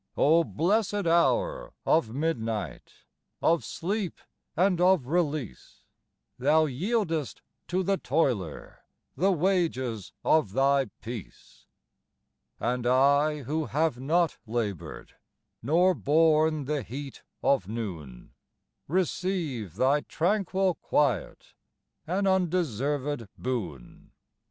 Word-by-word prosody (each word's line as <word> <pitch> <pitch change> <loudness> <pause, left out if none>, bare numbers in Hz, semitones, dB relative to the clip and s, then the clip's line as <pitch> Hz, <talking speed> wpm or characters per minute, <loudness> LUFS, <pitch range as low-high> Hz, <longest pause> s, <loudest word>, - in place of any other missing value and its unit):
O 165 +3 +5
blessed 205 +4 0
hour - - +1
of 155 -8 +3
midnight, 115 - -3 0.5
Of 165 0 +2
sleep 195 0 -3 0.4
and 180 0 +3
of 180 -6 +4
release, 150 - -3 0.6
Thou 155 +4 +4
yieldest 165 - -2 0.3
to 185 +2 0
the 195 +1 +1
toiler 125 - -1 0.4
The 190 +8 +2
wages 155 - 0
of 155 -12 +3
thy 135 +2 +3 0.2
peace. 115 -4 -9 0.9
And 120 0 -1
I, 140 +3 +3
who 155 +4 -2
have 155 -3 0
not 165 +5 +1
laboured, 110 -6 -4 0.5
Nor 175 +9 +3
borne 155 - +3
the 150 0 -1
heat 135 +4 -8 0.2
of 125 -10 +2
noon, 85 - -6 0.5
Receive 165 - -2
thy 135 +6 +3
tranquil 190 +2 0
quiet 135 - -1 0.5
An 190 +4 0
undeserved 150 - 0
boon. 95 - -5
150 Hz, 95 wpm, -27 LUFS, 125-175 Hz, 0.9 s, O